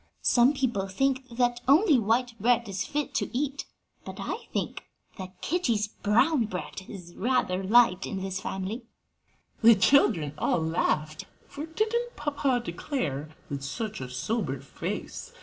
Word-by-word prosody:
"Some 245 +3 +5
people 235 -8 0
think 265 +6 0
that 240 0 0
only 300 - +6
white 230 +3 +1
bread 235 +1 +3
is 195 -1 -2
fit 295 0 -2
to - - -1
eat, 280 0 -2 0.4
but - - -8
I - - -5
think - - -3 0.4
that 185 -1 -8
Kitty's 230 - 0
brown 240 +7 +2
bread 190 -1 -6
is 180 -4 -10
rather 210 -5 +1
liked 195 -2 +4
in 195 - -4
this 190 -1 -3
family." 195 +6 -4 0.8
The 230 0 +8
children 190 - +3
all - - +2
laughed, 155 -1 -1 0.2
for 290 +3 -7
didn't 455 +8 -1
papa 280 -4 0
declare 165 - -3 0.2
with 140 -2 -4
such 205 +8 -4
a 130 - -5
sober 175 - -2
face! 475 - -6
230 Hz, 145 wpm, -27 LUFS, 185-270 Hz, 0.8 s, The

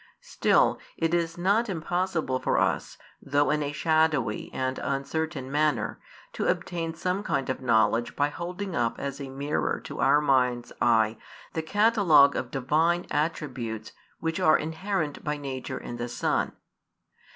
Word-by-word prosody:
Still, - - +2 0.2
it 165 0 0
is 170 -1 0
not 205 +6 +2
impossible 170 -5 -1
for - - 0
us, - - 0 0.2
though 145 0 +2
in 150 0 +1
a 145 -1 -2
shadowy 155 -7 +1
and 130 0 -2
uncertain 140 +1 -3
manner, 150 +1 0 0.3
to - - -2
obtain 170 -2 -2
some 180 +3 -1
kind 135 -10 -1
of 130 - -5
knowledge 115 -1 +2
by 145 0 +2
holding 180 +4 -5
up 115 -1 0
as 140 0 -5
a 135 - -6
mirror 140 +2 -1
to - - -8
our 145 - +5
mind's 125 -4 +1
eye 110 -2 +3 0.4
the 160 - -1
catalogue 175 -6 +5
of 130 - -3
Divine 155 +7 +1
attributes 130 -8 -2 0.3
which 165 +2 -2
are 155 -4 +5
inherent 160 0 -3
by 150 0 -2
nature 130 -2 -5
in 120 - -7
the 120 +1 -4
Son. - - 0
150 Hz, 150 wpm, -27 LUFS, 130-170 Hz, 0.4 s, our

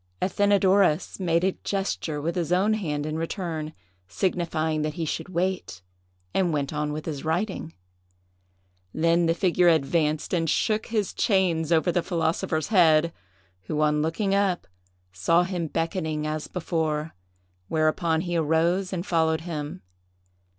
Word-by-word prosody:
Athenadorus 195 -4 +2
made 170 -2 +1
a 190 - +3
gesture 190 -6 -2
with 165 +4 -2
his 175 -2 -2
own 195 +4 +3
hand 150 -9 -2
in 155 +1 -3
return, 165 -3 -3 0.4
signifying 160 - -1
that 155 0 -2
he 165 - -2
should 160 - -4
wait, 175 - -2 0.5
and 180 -3 +2
went 145 -2 -1
on 150 0 -1
with 155 +1 -5
his 150 -4 -4
writing. 165 +1 -2 1.2
Then 165 +1 +3
the 165 - +2
figure 180 -1 +3
advanced 155 0 +1
and 165 -2 +1
shook 215 +6 +1
his 215 -4 -1
chains 175 -6 +1
over 165 +2 +3
the 175 - +1
philosopher's 160 -2 -1
head, 165 -5 +4 0.5
who, 150 - -2
on 150 0 +2
looking 195 +6 0
up, 195 -3 +1 0.5
saw 165 - +3
him 175 -2 -3
beckoning 160 -1 -2
as 155 0 -3
before; 160 -3 -2 0.5
whereupon 160 - +1
he 175 -1 -3
arose 170 +4 +1
and 180 -1 -3
followed 160 -2 +1
him. 150 - -5
165 Hz, 140 wpm, -25 LUFS, 155-180 Hz, 1.2 s, head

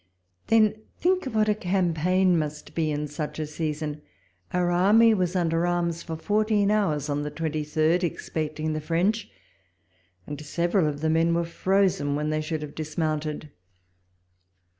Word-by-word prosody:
Then 215 -1 +3 0.2
think 370 0 +1
what 220 -4 +1
a 210 - +4
campaign 180 -1 +1
must 150 -2 -3
be 160 -2 0
in 150 0 -2
such 150 +1 -5
a 155 - -2
season! 150 -1 -4 0.5
Our 175 -1 +1
army 210 +6 +5
was 185 -3 0
under 170 -1 +1
arms 170 -1 -1
for 165 - -5
fourteen 210 +3 +1
hours 155 -9 +1
on 145 0 -1
the 150 - -3
twenty 155 0 -3
third, 155 +4 +1
expecting 155 -2 -3
the 155 - -3
French; 180 +8 0 1.0
and 145 0 -6
several 170 +3 +1
of 145 -1 -3
the 160 - +1
men 165 +1 +3
were 170 0 0
frozen 180 -4 +1
when 150 +1 -1
they 155 0 0
should 155 0 -3
have 145 - -8
dismounted. 155 -1 -3
165 Hz, 155 wpm, -26 LUFS, 155-185 Hz, 1.0 s, army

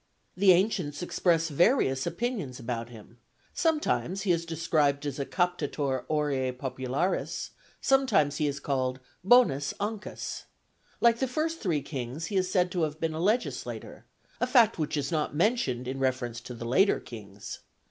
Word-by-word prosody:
The 190 0 +6
ancients 180 -5 +1
express 165 -2 +1
various 145 - +2
opinions 175 - -3
about 115 -1 -4
him; 115 0 -14 0.3
sometimes 300 - 0
he 195 - +2
is 170 -1 0
described 150 -3 +1
as 145 -1 -3
a 140 - -2
captator 150 -7 -1
auræ 140 -4 0
popularis; 130 +6 -2 0.3
sometimes 265 - +3
he 150 - +1
is 140 0 -2
called 130 -2 -1 0.2
bonus 195 - +4
Ancus. 210 +1 -4 0.6
Like 235 0 +5
the 265 - +1
first 320 +5 -2
three 160 - 0
kings, 135 +2 -5
he - - -1
is 185 -1 +2
said 180 -1 +2
to 175 - -1
have 155 -1 -1
been 165 -1 -1
a 160 - -4
legislator, 215 +8 -2 0.3
a - - +1
fact 230 -7 +4
which 155 0 -1
is 140 +1 -2
not 155 -2 -1
mentioned 150 - +1
in 135 +1 -3
reference 125 -3 -1
to 125 0 -8
the 115 - -7
later 185 - +3
kings. 100 -4 -9
155 Hz, 155 wpm, -28 LUFS, 130-190 Hz, 0.6 s, The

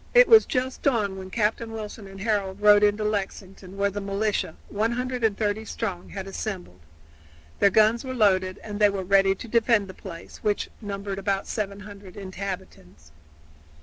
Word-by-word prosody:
It - - +8
was 445 -1 +7
just 255 0 -2
dawn 215 -8 +1
when 190 0 -8
Captain 225 +2 0
Wilson 215 -2 -7
and 195 0 -11
Harold 200 -2 -1
rode 205 0 +7
into 210 +1 +3
Lexington, 195 -2 -4
where 200 0 +1
the 205 +1 -4
militia, 200 -4 -1
130 225 -2 0
strong, 195 -5 -4
had 195 -2 -6
assembled. 190 - -6 0.8
Their 200 - +6
guns 220 +3 +4
were 260 -1 -5
loaded 190 -4 +2
and 210 -1 -6
they 210 -1 +6
were 195 -1 -3
ready 195 +1 +4
to 235 - -9
defend 230 -2 +3
the 190 - -9
place, 170 -3 -10
which 210 -1 -1
numbered 200 -1 -4
about 195 0 -1
700 200 -2 -6
inhabitants. 185 - -7
205 Hz, 155 wpm, -25 LUFS, 195-215 Hz, 0.8 s, It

